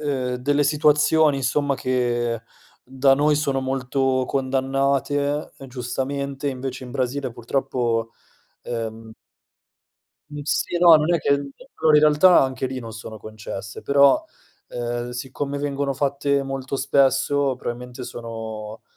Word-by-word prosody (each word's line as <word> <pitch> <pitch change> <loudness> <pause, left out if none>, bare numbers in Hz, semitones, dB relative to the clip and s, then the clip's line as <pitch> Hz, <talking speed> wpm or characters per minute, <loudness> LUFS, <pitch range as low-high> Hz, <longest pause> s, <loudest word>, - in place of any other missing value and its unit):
ehm, 130 -4 -1
delle 145 +3 +1
situazioni 150 0 +3
insomma 140 +2 0
che 120 -3 -1 0.4
da 135 +1 +3
noi 150 +2 +3
sono 140 -3 0
molto 130 0 0
condannate, 140 +2 0 0.2
giustamente, 135 +3 -3
invece 130 -1 -5
in 125 - -9
Brasile 130 +2 -2
purtroppo 120 -1 -1 0.5
ehm 115 -1 -5 1.3
Sì, 175 - 0
no, 170 -1 +8
non 155 +3 +1
è - - +2
che - - -4
allora 150 - +1
in - - +6
realtà 155 +4 +6
anche 130 0 -2
lì 130 0 -5
non 115 -2 -8
sono 110 0 -9
concesse, 105 -2 -8
però, 140 - +4 0.5
ehm, 120 0 -4
siccome 135 +3 -4
vengono 140 -1 -1
fatte 140 +1 0
molto 135 0 -4
spesso, 135 0 +2
probabilmente 125 +1 -6
sono 110 -2 -7
135 Hz, 120 wpm, -23 LUFS, 125-140 Hz, 1.3 s, no